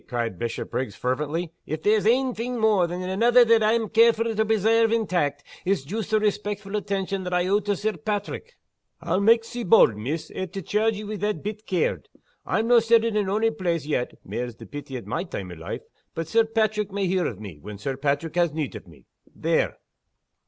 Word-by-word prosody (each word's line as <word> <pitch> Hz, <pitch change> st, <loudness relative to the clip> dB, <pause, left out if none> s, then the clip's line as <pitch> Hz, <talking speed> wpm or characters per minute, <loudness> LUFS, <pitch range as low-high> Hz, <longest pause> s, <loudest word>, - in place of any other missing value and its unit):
cried 115 Hz, -6 st, -3 dB
Bishopriggs, 120 Hz, +2 st, -3 dB
fervently. 150 Hz, +6 st, -2 dB, 0.2 s
"If 155 Hz, 0 st, -4 dB
there's 210 Hz, 0 st, +3 dB
ain 255 Hz, +2 st, +3 dB
thing 240 Hz, +2 st, -3 dB
mair 210 Hz, -5 st, +3 dB
than 175 Hz, +2 st, -4 dB
anither 235 Hz, +7 st, +4 dB
that 230 Hz, -1 st, +5 dB
I'm 220 Hz, +1 st, +2 dB
carefu' 230 Hz, +1 st, +3 dB
to 220 Hz, -, +3 dB
presairve 225 Hz, +1 st, +3 dB
intact, 175 Hz, -11 st, 0 dB, 0.2 s
it's 190 Hz, -5 st, 0 dB
joost 210 Hz, +9 st, -4 dB
the 215 Hz, -1 st, +3 dB
respectful 210 Hz, -1 st, -2 dB
attention 195 Hz, -1 st, -2 dB
that 180 Hz, 0 st, -2 dB
I 180 Hz, 0 st, +2 dB
owe 200 Hz, +2 st, +3 dB
to 205 Hz, 0 st, -1 dB
Sir 215 Hz, +3 st, -1 dB
Paitrick. 220 Hz, -, -4 dB, 0.4 s
I'll 185 Hz, -, 0 dB
make 225 Hz, +2 st, +5 dB
sae 240 Hz, +1 st, -6 dB
bauld, 180 Hz, -, +6 dB
miss, 135 Hz, +10 st, -4 dB
au 190 Hz, -, -3 dB
to 195 Hz, +3 st, -6 dB
chairge 215 Hz, +5 st, +1 dB
ye 210 Hz, -, -6 dB
wi' 210 Hz, 0 st, -5 dB
that 210 Hz, +2 st, -2 dB
bit 210 Hz, +1 st, -6 dB
caird. 180 Hz, -3 st, -1 dB, 0.4 s
I'm 225 Hz, +1 st, +1 dB
no' 240 Hz, 0 st, +7 dB
settled 230 Hz, -1 st, +3 dB
in 205 Hz, -2 st, +1 dB
ony 220 Hz, +3 st, +2 dB
place 175 Hz, -8 st, -2 dB
yet 145 Hz, -5 st, -1 dB
(mair's 120 Hz, -1 st, -4 dB
the -, -, -12 dB
pity 145 Hz, -2 st, -7 dB
at 120 Hz, -, -9 dB
my 140 Hz, -, -2 dB
time 95 Hz, -, -6 dB
o' -, -, -6 dB
life!), 80 Hz, 0 st, -6 dB, 0.3 s
but 165 Hz, -1 st, -3 dB
Sir 225 Hz, +6 st, +3 dB
Paitrick 215 Hz, -2 st, 0 dB
may 200 Hz, 0 st, -1 dB
hear 185 Hz, 0 st, +1 dB
o' 115 Hz, -, -4 dB
me, 95 Hz, -6 st, -10 dB
when 105 Hz, +6 st, -8 dB
Sir 135 Hz, +7 st, -3 dB
Paitrick 145 Hz, +3 st, -1 dB
has 170 Hz, -2 st, +2 dB
need 150 Hz, -6 st, -3 dB
o' 100 Hz, -4 st, -10 dB
me, 80 Hz, -, -18 dB, 0.3 s
there." -, -, 0 dB
200 Hz, 205 wpm, -25 LUFS, 150-220 Hz, 0.4 s, no